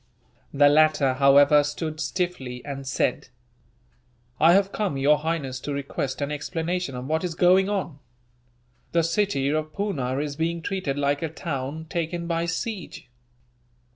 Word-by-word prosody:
The 145 +1 +5
latter, 150 -2 +4
however, 140 +2 +6
stood 155 +1 -4
stiffly, 155 -10 -3
and 135 -1 -6
said: 130 -1 -1 1.1
"I 165 +2 +6
have 195 +1 +3
come, 200 -10 -2
Your 145 +2 +3
Highness, 150 -5 -3
to 145 - -4
request 140 0 -4
an 140 - -3
explanation 165 +1 -3
of 125 0 -6
what 160 +4 -1
is 175 -2 -3
going 185 +3 +4
on. 185 -8 -3 0.9
The 170 -1 +3
city 165 -4 0
of 155 +1 -2
Poona 140 -11 -2
is 145 0 -3
being 165 +2 -2
treated 185 -8 -2
like 145 0 0
a 165 - -2
town 150 -1 -5
taken 170 +1 -3
by 170 0 -1
siege. 190 - -5
155 Hz, 145 wpm, -25 LUFS, 140-170 Hz, 1.1 s, however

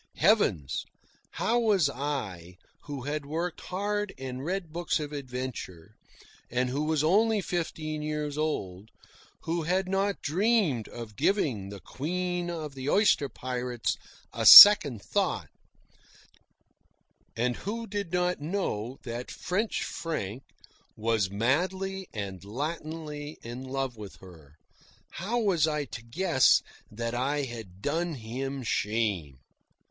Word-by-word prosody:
Heavens! 115 - +2 0.5
How 235 +2 +1
was 205 -9 +3
I, 115 - -4 0.3
who 145 -4 -6
had 145 +2 -3
worked 165 +4 -4
hard 205 +2 -3
and 130 0 -6
read 175 -1 -3
books 170 -1 -1
of 150 -1 -5
adventure, 125 - -6 0.6
and 125 +1 0
who 145 +3 -1
was 155 -1 +1
only 215 +6 +3
fifteen 160 -4 -3
years 150 -1 -3
old, 105 -11 -3 0.5
who 170 +1 -2
had 180 +4 0
not 195 +1 -1
dreamed 180 - +1
of 115 -3 -9
giving 125 - 0
the 100 0 -8
Queen 175 - -3
of 155 -4 -5
the 135 +1 -4
Oyster 195 -8 +3
Pirates 125 -1 -3 0.4
a - - -3
second 145 - +11
thought, - - -1 1.9
and 120 +1 0
who 230 +3 -4
did 205 -5 -4
not 180 -2 0
know 135 - -3
that 120 0 -6
French 210 +5 -2
Frank 130 - -4 0.5
was 110 -3 0
madly 185 - -1
and 95 -4 -6
Latinly 150 +5 -5
in 120 +2 -7
love 135 -2 -3
with 105 -2 -9
her 80 -6 -16 0.6
how 205 +8 -3
was 190 -9 +2
I 150 -2 -1
to 115 - -8
guess 130 +3 +3 0.3
that 115 +2 -4
I 140 +4 0
had 110 -7 -8
done 165 +2 -1
him 130 +3 -5
shame? 105 - -1
145 Hz, 125 wpm, -28 LUFS, 115-175 Hz, 1.9 s, second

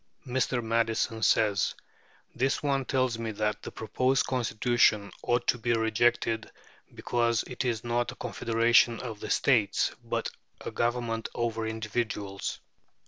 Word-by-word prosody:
Mr. 130 -1 0
Madison 115 0 0
says: 105 -2 +2 0.6
"This 135 +3 0
one 135 -2 +1
tells 130 -3 0
me 115 -1 -3
that 105 0 -1
the - - -7
proposed 125 +4 +1
Constitution 120 -4 +2
ought 120 0 0
to 120 - +2
be 120 +1 +1
rejected, 115 0 +1 0.5
because 115 -1 +1
it 125 - -4
is 115 -3 -1
not 120 0 0
a - - -11
confederation 115 0 +2
of 115 -4 -6
the - - -6
states, 110 -7 +2
but - - -2 0.3
a - - -5
government 120 -1 -1
over 115 -1 -1
individuals. 110 -3 -3
115 Hz, 135 wpm, -28 LUFS, 110-120 Hz, 0.6 s, says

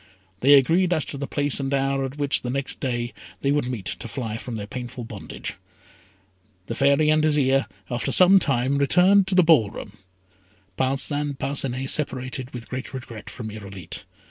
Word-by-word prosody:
They 140 +5 +7
agreed 170 +7 +4
as 155 -4 0
to 140 - -6
the 140 - -3
place 145 -1 -1
and 135 0 -2
hour 135 0 +1
at 135 +2 -7
which, 145 -1 +1
the 125 - -4
next 135 +1 -3
day, 120 -2 -2 0.3
they 140 - +1
would 145 -3 +1
meet, 120 -7 -5
to 120 - -4
fly 115 -3 -4
from 115 +1 -6
their 105 -2 -4
painful 125 +2 -7
bondage. 115 - -8 1.1
The - - -4
Fairy 140 +2 +3
and 155 0 +3
Azire, 135 -3 +2 0.2
after 120 -2 -2
some 190 +1 +8
time, 135 -2 +1
returned 185 +7 +5
to 190 - +1
the 185 - +6
ball 155 -11 +5
room. 105 0 -10 0.8
Parcin 140 +4 -1
Parcinet 135 -1 -2
separated 130 -2 -2
with 120 0 -9
regret 130 -3 -7
from 110 -3 -6
Irolite. 100 -5 -7
135 Hz, 170 wpm, -24 LUFS, 125-145 Hz, 1.1 s, some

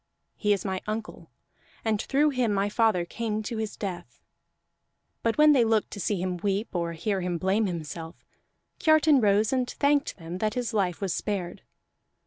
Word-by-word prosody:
He 210 - 0
is 200 -2 +1
my 190 -1 -2
uncle, 215 +1 -5 0.6
and 215 -2 +1
through 295 +2 +2
him 250 -5 +1
my 200 0 +1
father 210 -5 +2
came 215 +2 -3
to 230 +1 -4
his 220 -1 -4
death." 175 - -6 1.0
But 230 -1 0
when 300 0 +7
they 265 -5 +5
looked 220 -2 +1
to - - -7
see 200 0 -1
him 180 0 -2
weep, 200 +4 -1
or 170 -2 -1
hear 190 +4 -2
him 175 -1 -1
blame 195 +5 +1
himself, 165 -1 -6 0.6
Kiartan 310 -3 +5
rose 210 +2 +3
and 255 -1 0
thanked 285 0 +1
them 170 +1 -7
that 215 +1 -1
his 245 -2 -2
life 190 -5 0
was 195 -3 -1
spared. 190 -5 -3
210 Hz, 175 wpm, -27 LUFS, 180-230 Hz, 1.0 s, when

